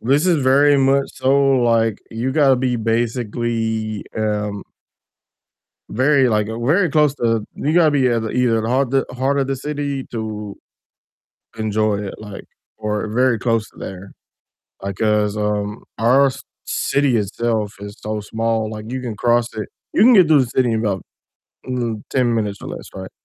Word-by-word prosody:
this 140 Hz, +8 st, +2 dB
is 170 Hz, -6 st, +2 dB
very 140 Hz, +2 st, +5 dB
much 135 Hz, 0 st, +2 dB
so, 130 Hz, +1 st, +1 dB, 0.3 s
like, 115 Hz, -2 st, +2 dB
you 120 Hz, +3 st, -2 dB
gotta 140 Hz, -4 st, +4 dB
be 125 Hz, -1 st, 0 dB
basically, 115 Hz, -1 st, -2 dB
um 105 Hz, -2 st, -2 dB, 1.3 s
very, 130 Hz, +3 st, +3 dB
like 105 Hz, -2 st, +1 dB
very 145 Hz, -, +1 dB
close 150 Hz, -2 st, +3 dB
to 115 Hz, -4 st, 0 dB
you 150 Hz, -, -1 dB
gotta 165 Hz, -3 st, +4 dB
be 135 Hz, -3 st, +3 dB
at 115 Hz, -2 st, +1 dB
either 120 Hz, -3 st, +2 dB
the 110 Hz, -, -3 dB
heart 130 Hz, +1 st, +1 dB
the 135 Hz, 0 st, +1 dB
heart 135 Hz, +2 st, +1 dB
of 135 Hz, -, +1 dB
the 135 Hz, -, -1 dB
city 140 Hz, 0 st, -3 dB
to 105 Hz, -3 st, -5 dB, 1.0 s
enjoy 110 Hz, -1 st, 0 dB
it, 100 Hz, -1 st, -5 dB
like 105 Hz, -2 st, -9 dB, 0.3 s
or 105 Hz, -1 st, -2 dB
very 120 Hz, +2 st, +2 dB
close 115 Hz, -1 st, 0 dB
to -, -, -28 dB
there, 95 Hz, +1 st, -8 dB, 0.7 s
like, 100 Hz, -1 st, -5 dB
'cause, 105 Hz, -1 st, +1 dB
um, 105 Hz, 0 st, -2 dB, 0.2 s
our 130 Hz, +5 st, +4 dB
c 135 Hz, +1 st, -8 dB, 0.2 s
city 140 Hz, -3 st, +1 dB
itself 110 Hz, 0 st, -1 dB
is 100 Hz, +1 st, -8 dB
so 110 Hz, 0 st, -3 dB
small, 110 Hz, +1 st, -1 dB
like, 110 Hz, +1 st, -7 dB
you 130 Hz, -, -3 dB
can 120 Hz, -4 st, -5 dB
cross 120 Hz, +2 st, +1 dB
it 110 Hz, -, -5 dB, 0.2 s
you -, -, +2 dB
can 245 Hz, +2 st, +7 dB
get 185 Hz, -6 st, +6 dB
through 150 Hz, -3 st, +5 dB
the 130 Hz, -, 0 dB
city 120 Hz, 0 st, +1 dB
in 110 Hz, -, 0 dB
about, 100 Hz, -4 st, -1 dB, 0.7 s
mm, 120 Hz, -4 st, -2 dB
10 125 Hz, -3 st, +1 dB
minutes 105 Hz, -3 st, -2 dB
or -, -, -7 dB
less, -, -, -8 dB
right, 95 Hz, 0 st, -7 dB
115 Hz, 170 wpm, -20 LUFS, 105-135 Hz, 1.3 s, can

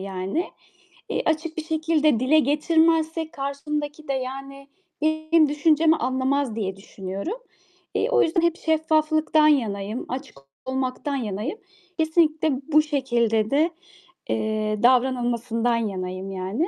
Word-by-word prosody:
yani. 195 Hz, -, -3 dB, 0.7 s
Eee, -, -, 0 dB
açık 320 Hz, 0 st, -1 dB
bir 320 Hz, -, -2 dB
şekilde 315 Hz, -5 st, +1 dB
dile 290 Hz, +5 st, +4 dB
getirmezsek 320 Hz, +2 st, +2 dB
karşımdaki 295 Hz, +2 st, -4 dB
de, 275 Hz, -, 0 dB
yani, 275 Hz, +1 st, -6 dB, 0.3 s
benim 315 Hz, 0 st, +3 dB
düşüncemi 315 Hz, +2 st, +3 dB
anlamaz 260 Hz, -1 st, 0 dB
diye 195 Hz, -4 st, -3 dB
düşünüyorum. 195 Hz, -, -6 dB, 0.6 s
Eee, -, -, +1 dB
o 475 Hz, -2 st, +4 dB
yüzden 330 Hz, +1 st, +2 dB
hep 340 Hz, 0 st, +1 dB
şeffaflıktan 310 Hz, -1 st, +2 dB
yanayım, 215 Hz, -6 st, 0 dB
açık 260 Hz, -, -6 dB, 0.3 s
olmaktan 260 Hz, +2 st, -2 dB
yanayım. 230 Hz, -, -3 dB, 0.4 s
Kesinlikle 315 Hz, -1 st, +2 dB, 0.2 s
bu 305 Hz, +1 st, +6 dB
şekilde 235 Hz, -7 st, 0 dB
de, 310 Hz, +4 st, +3 dB, 0.6 s
eee, 215 Hz, -1 st, -1 dB
davranılmasından 245 Hz, -2 st, +2 dB
yanayım 190 Hz, -3 st, -3 dB
yani. 195 Hz, -, -2 dB
280 Hz, 115 wpm, -24 LUFS, 230-315 Hz, 0.7 s, bu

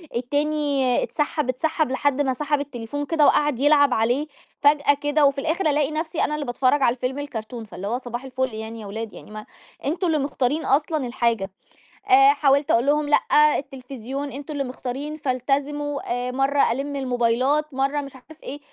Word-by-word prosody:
التاني 285 Hz, 0 st, 0 dB
اتسحَّب، 295 Hz, -2 st, -2 dB
اتسحَّب 310 Hz, +2 st, 0 dB
لحد 285 Hz, +1 st, +1 dB
ما 265 Hz, -2 st, +1 dB
سحب 295 Hz, +2 st, -1 dB
التليفون 285 Hz, 0 st, -5 dB
كده 305 Hz, 0 st, +2 dB
وقعد 295 Hz, -4 st, +3 dB
يلعب 285 Hz, -1 st, +4 dB
عليه، 245 Hz, +7 st, +1 dB, 0.3 s
فجأة 285 Hz, 0 st, +4 dB
كده، 290 Hz, +1 st, +1 dB
وفي 275 Hz, 0 st, +2 dB
الآخر 325 Hz, +4 st, 0 dB
ألاقي 290 Hz, 0 st, +1 dB
نفسي 315 Hz, +1 st, -2 dB
أنا 300 Hz, -, 0 dB
اللي 300 Hz, -1 st, -4 dB
باتفرج 255 Hz, +3 st, +1 dB
على 240 Hz, -, +4 dB
الفيلم 255 Hz, +2 st, -3 dB
الكارتون، 230 Hz, -4 st, -6 dB
فاللي 200 Hz, -2 st, -7 dB
هو 235 Hz, +4 st, -1 dB
صباح 245 Hz, 0 st, -6 dB
الفُل 260 Hz, -2 st, -3 dB
يعني 220 Hz, +1 st, -7 dB
يا -, -, -8 dB
ولاد، 220 Hz, +1 st, -6 dB
يعني -, -, -12 dB
ما 215 Hz, 0 st, -8 dB, 0.4 s
أنتم 340 Hz, +6 st, 0 dB
اللي 320 Hz, -2 st, +2 dB
مختارين 280 Hz, +1 st, -1 dB
أصلًا 295 Hz, 0 st, +1 dB
الحاجة، 235 Hz, -5 st, -1 dB, 0.6 s
آآ 410 Hz, +2 st, +7 dB
حاولت 280 Hz, -4 st, +2 dB
أقول 235 Hz, +2 st, +3 dB
لهم: 295 Hz, +1 st, +2 dB
"لأ، 300 Hz, 0 st, +4 dB
التلفزيون 270 Hz, 0 st, -6 dB
أنتم 285 Hz, +2 st, -7 dB
اللي 285 Hz, -1 st, -1 dB
مختارين 265 Hz, +3 st, -5 dB
فالتزموا." 285 Hz, +1 st, -2 dB, 0.3 s
آآ، -, -, -3 dB
مَرّة 270 Hz, 0 st, +2 dB
ألِمّ 275 Hz, +4 st, -3 dB
الموبايلات، 260 Hz, +3 st, 0 dB
مَرّة 275 Hz, +2 st, 0 dB
مش 275 Hz, -1 st, -10 dB
عارف 310 Hz, +4 st, -16 dB
إيه، 285 Hz, +2 st, -7 dB
275 Hz, 175 wpm, -23 LUFS, 250-295 Hz, 0.6 s, آآ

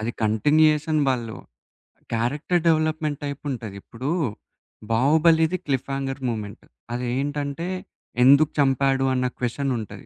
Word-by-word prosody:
అది 110 Hz, +2 st, -2 dB
కంటిన్యూయేషన్ 150 Hz, +7 st, +3 dB
వాళ్ళు 120 Hz, -4 st, -1 dB, 0.8 s
character 145 Hz, +9 st, 0 dB
development 155 Hz, -2 st, +1 dB
type 140 Hz, -1 st, -5 dB
ఉంటది. 115 Hz, -6 st, -6 dB
ఇప్పుడు 130 Hz, +5 st, -6 dB, 0.8 s
'బాహుబలిది' 160 Hz, +7 st, +3 dB
క్లిఫ్ 135 Hz, -1 st, -1 dB
హంగర్ 135 Hz, 0 st, -3 dB
మూవ్‌మెంట్. 105 Hz, -4 st, -5 dB, 0.3 s
అది 125 Hz, +1 st, -3 dB
ఏంటంటే, 145 Hz, +3 st, -3 dB, 0.6 s
ఎందుకు 140 Hz, +4 st, +6 dB
చంపాడు 135 Hz, 0 st, +2 dB
అన్న 125 Hz, 0 st, 0 dB
క్వెషన్ 130 Hz, +3 st, -1 dB
ఉంటది. 110 Hz, -3 st, -8 dB
140 Hz, 115 wpm, -24 LUFS, 125-155 Hz, 0.8 s, ఎందుకు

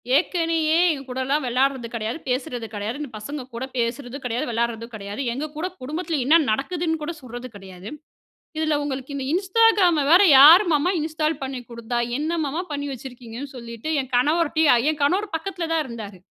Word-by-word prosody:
ஏற்கனயே 325 Hz, -1 st, +2 dB
எங்க 285 Hz, -3 st, -4 dB
கூடலாம் 260 Hz, +3 st, -1 dB
விளையாடுறது 255 Hz, 0 st, 0 dB
கிடையாது, 225 Hz, +3 st, -3 dB
பேசுறது 250 Hz, -2 st, -2 dB
கிடையாது, 215 Hz, +7 st, -4 dB
இந்த 290 Hz, -, -5 dB
பசங்க 280 Hz, +7 st, -6 dB
கூட 235 Hz, -, -4 dB
பேசுறதும் 245 Hz, +3 st, -3 dB
கிடையாது, 240 Hz, +1 st, -1 dB
விளையாடுறதும் 230 Hz, 0 st, -2 dB
கிடையாது, 205 Hz, +4 st, -6 dB
எங்க 295 Hz, +5 st, -3 dB
கூட 345 Hz, -, -1 dB
குடும்பத்தில 310 Hz, +3 st, -3 dB
என்ன 305 Hz, +5 st, +5 dB, 0.2 s
நடக்குதுன்னு 320 Hz, +6 st, -1 dB
கூட 305 Hz, +3 st, -3 dB
சொல்றது 245 Hz, 0 st, -8 dB
கிடையாது. 190 Hz, 0 st, -10 dB, 0.7 s
இதில 310 Hz, -1 st, +1 dB
உங்களுக்கு 270 Hz, 0 st, -5 dB
இந்த 270 Hz, -1 st, -3 dB
Instagram 385 Hz, -2 st, +4 dB
வேற, 360 Hz, +3 st, +8 dB, 0.2 s
யாரு 330 Hz, +9 st, +9 dB
மாமா 300 Hz, +5 st, +2 dB
இன்ஸ்டால் 310 Hz, -1 st, -1 dB
பண்ணி 265 Hz, -2 st, -4 dB
குடுத்தா? 235 Hz, 0 st, -3 dB, 0.2 s
என்ன 305 Hz, +3 st, -2 dB
மாமா 305 Hz, +6 st, -2 dB
பண்ணி 285 Hz, 0 st, -3 dB
வச்சிருக்கீங்கன்னு 250 Hz, +1 st, -9 dB
சொல்லிட்டு 235 Hz, +5 st, -6 dB
என் 260 Hz, -1 st, -11 dB
கணவர்டியும் 300 Hz, -2 st, +3 dB
என் 305 Hz, -1 st, -6 dB
கணவர் 370 Hz, +6 st, +1 dB
பக்கத்தில 350 Hz, 0 st, -4 dB
தான் 315 Hz, -2 st, +1 dB
இருந்தாரு. 220 Hz, -5 st, -8 dB
275 Hz, 160 wpm, -23 LUFS, 240-315 Hz, 0.7 s, யாரு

